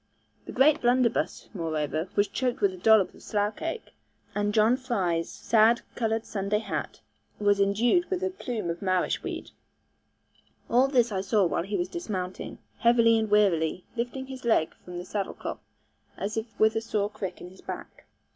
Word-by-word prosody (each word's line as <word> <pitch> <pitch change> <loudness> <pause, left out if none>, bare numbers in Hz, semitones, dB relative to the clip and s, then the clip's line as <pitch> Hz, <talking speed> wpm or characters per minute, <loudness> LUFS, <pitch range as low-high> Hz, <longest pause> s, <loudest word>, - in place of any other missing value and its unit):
The - - -5
great 290 +3 +4
blunderbuss, 245 -1 +1
moreover, 160 -1 -2
was 205 0 +3
choked 250 -2 -1
with 200 -2 +2
a - - -9
dollop 215 +1 +4
of - - -17
slough 210 0 -1
cake; 330 +7 -5 0.4
and 205 +1 0
John 220 +3 +4
Fry's 190 -11 -1
sad 225 +2 +3
coloured 225 -1 -1
Sunday 200 0 -1
hat 220 - -4 0.4
was 205 -1 +2
indued 235 - +2
with 375 -1 -1
a 380 - 0
plume 230 - -3
of 170 - -7
marish 185 -2 +1
weed. - - -6 1.2
All 250 +3 +5
this 245 -4 +2
I 190 -2 -1
saw 200 0 +2
while 170 - 0
he 195 +4 -2
was 350 - -1
dismounting, 195 - -5 0.2
heavily 230 -1 +5
and 220 -1 -1
wearily, 185 -5 +2
lifting 245 +3 -3
his 265 -1 -9
leg 220 -9 +2
from 180 -1 -8
the 175 - -6
saddle 200 +1 -3
cloth - - -6 0.6
as 205 +2 -3
if 225 +1 -2
with 220 0 +4
a 225 - +1
sore 210 -2 -1
crick 195 -3 -5
in 180 - -10
his 190 - -16
back. - - -8
215 Hz, 175 wpm, -27 LUFS, 190-240 Hz, 1.2 s, All